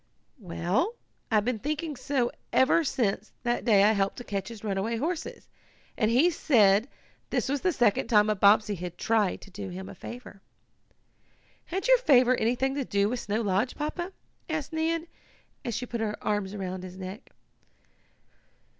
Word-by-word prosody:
"Well, 185 - -1 0.3
I've 215 -2 +2
been 245 -3 -1
thinking 305 +4 -3
so 260 -1 -1 0.2
ever 260 +5 +4
since 215 -7 -1
that 240 0 0
day 205 -5 +5
I 210 - +6
helped 195 -2 0
to 245 - -6
catch 200 -4 -4
his 225 -3 -9
runaway 210 +2 -1
horses, 320 +6 -4 0.5
and 215 - +1
he 270 +10 +4
said 215 -8 +4 0.4
this - - 0
was 280 +1 -1
the 370 - +2
second 235 - +2
time 210 -3 +4
a 215 - +3
Bobbsey 205 +2 +4
had 175 -2 -6
tried 220 -4 +1
to 195 - -13
do 195 +1 -6
him 185 +1 -7
a - - -8
favor.'" 235 -5 -10 1.2
"Had 380 +6 -3
your - - +6
favor 255 - +5
anything 250 +4 0
to 280 0 -1
do 200 -3 +1
with 245 +1 -2
Snow 210 +1 -2
Lodge, 205 +3 0
Papa?" 345 +5 -3 0.4
asked 315 0 -3
Nan, 325 +1 0 0.6
as 235 - -3
she 245 +3 -3
put 235 -1 -4
her 210 -1 -1
arms 205 -2 -1
about 185 -2 -4
his 185 0 -9
neck. 190 +6 -8
225 Hz, 170 wpm, -28 LUFS, 200-270 Hz, 1.2 s, I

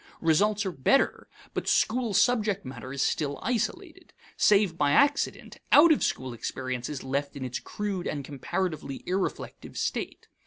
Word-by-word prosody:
Results 200 +6 +2
are 190 - -1
better, 170 - +1 0.3
but - - -3
school 230 -2 +1
subject 205 - +2
matter 130 0 -8
is 140 -1 -1
still 145 -2 -1
isolated. 240 -1 -3 0.2
Save 200 -4 +4
by 145 -3 +2
accident, 285 0 +1
out 315 +3 +8
of 310 - +3
school 130 -1 -1
experience 125 +1 -4
is 145 -3 -5
left 140 +2 -2
in 135 -2 -5
its 125 - -4
crude 200 -4 -4
and 140 -2 -3
comparatively 150 0 -4
irreflective 190 +1 -3
state. - - -3
165 Hz, 150 wpm, -27 LUFS, 135-210 Hz, 0.3 s, out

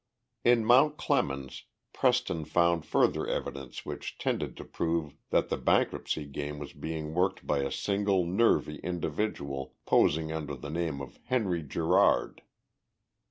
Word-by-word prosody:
In 120 -2 +4
Mount 135 +6 +5
Clemens 70 -1 -1 0.3
Preston 125 -10 +1
found 85 -1 +2
further - - +2
evidence 70 -2 -4
which - - -6
tended - - -2
to - - -8
prove 80 -3 -2
that - - +2
the - - 0
bankruptcy 75 - +1
game 75 +1 -5
was 75 -1 -8
being 80 -1 -5
worked 90 +3 0
by 75 - +1
a 70 - -1
single 100 -2 +1
nervy 90 -4 +2
individual, 80 -6 -3
posing 80 +1 +3
under 80 -2 -4
the 75 - -7
name 80 -4 -2
of 70 - -10
"Henry 105 -9 0
Gerard." 80 +2 +2
80 Hz, 135 wpm, -29 LUFS, 75-100 Hz, 0.3 s, Mount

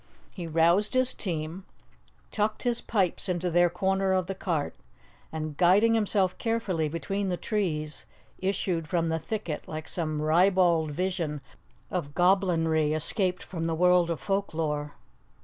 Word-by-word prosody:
He 175 -4 -6
roused 170 +8 +3
his 255 0 +3
team, 165 0 -4 0.7
tucked 215 0 -1
his 240 -1 0
pipes 195 -2 0
into 180 0 -1
their 175 +1 +4
corner 190 +2 0
of 185 -1 +1
the 195 - -4
cart, 170 -6 -2 0.6
and, 155 -1 -4
guiding 195 +7 +4
himself 200 -4 +2
carefully 200 -9 -1
between 195 +5 -2
the 180 - -1
trees, 160 -9 -2 0.3
issued 185 -4 -1
from 165 +1 0
the 160 0 0
thicket 160 -2 -4
like 155 0 -6
some 155 -3 -2
ribald 170 0 +3
vision 170 -2 -2 0.5
of 145 -6 -3
goblinry 165 -5 +2
escaped 180 +4 0
from 165 -3 -4
the 165 - -1
world 180 0 +4
of 165 - -2
folk 195 -4 -2
lore. 150 -2 -2
175 Hz, 145 wpm, -27 LUFS, 160-195 Hz, 0.7 s, their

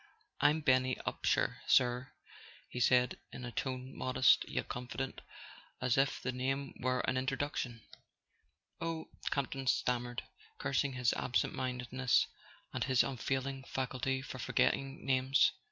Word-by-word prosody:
"I'm 155 +2 +4
Benny 130 -2 +3
Upsher, - - +1
sir," 125 +1 +3 0.6
he 125 - -5
said, 125 +1 +3
in 125 - -7
a 120 - -5
tone 130 +2 -4
modest 130 0 +4
yet - - -2
confident, 130 +2 -4 0.6
as 125 -2 +2
if 135 +1 +2
the 130 - -2
name 135 +2 -2
were 125 0 +1
an 130 - 0
introduction. 130 -3 -2 1.0
"Oh 165 -1 -3
" - - -3
Campton 135 -1 -2
stammered, 120 0 0 0.3
cursing 140 - 0
his 125 -3 +2
absent 125 - 0
mindedness 125 0 +1 0.5
and - - 0
his 130 -2 +4
unfailing 135 +1 -2
faculty 130 0 -2
for 130 -1 -7
forgetting 135 +1 0
names. 130 0 +4
130 Hz, 130 wpm, -34 LUFS, 125-135 Hz, 1.0 s, I'm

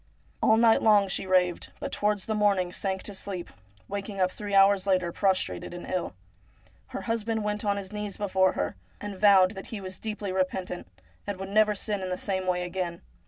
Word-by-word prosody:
All 220 - +5
night 225 -1 +5
long 210 -2 +5
she 190 - -1
raved, 180 -2 +1
but - - -4
towards 205 -2 0
the 220 - -1
morning 200 -4 +2
sank 190 0 -2
to 205 - -7
sleep, 190 -2 -5 0.4
waking 200 0 -5
up 185 0 +2
three 205 0 -4
hours 195 0 +5
later 185 -3 +2
prostrated 180 - 0
and 175 - -7
ill. 180 - -2 0.7
Her 260 +1 -6
husband 225 -1 -1
went 210 0 -2
on 200 -1 +1
his 195 -1 -6
knees 210 -1 -4
before 190 -2 +2
her, 90 - -2 0.2
and 205 -1 -6
vowed 195 -3 +6
that 195 -2 -8
he 220 - -5
was 185 -1 -7
deeply 210 -3 -4
repentant, 185 - -2 0.4
and 205 -2 -3
would 195 0 -5
never 215 +1 +4
sin 205 0 -3
in 185 - -3
the 180 - -2
same 190 -2 -2
way 180 -1 +1
again. 175 -1 -4
195 Hz, 200 wpm, -27 LUFS, 185-210 Hz, 0.7 s, vowed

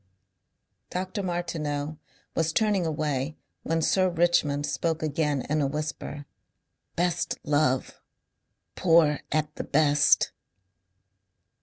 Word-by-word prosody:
Dr. 185 +3 -3
Martineau 155 -5 -3 0.3
was 165 -1 +1
turning 200 -2 +2
away 150 -2 -2 0.2
when 165 0 -1
Sir 185 +2 +3
Richmond 165 -4 +2
spoke 160 +1 -1
again 150 -3 0
in 150 +1 +1
a 140 - +2
whisper. 150 0 -5 0.7
"Best 175 0 0
love...Poor 150 +2 0
at 155 0 0
the - - -3
best...." 145 -1 +3
155 Hz, 95 wpm, -27 LUFS, 145-170 Hz, 0.7 s, Sir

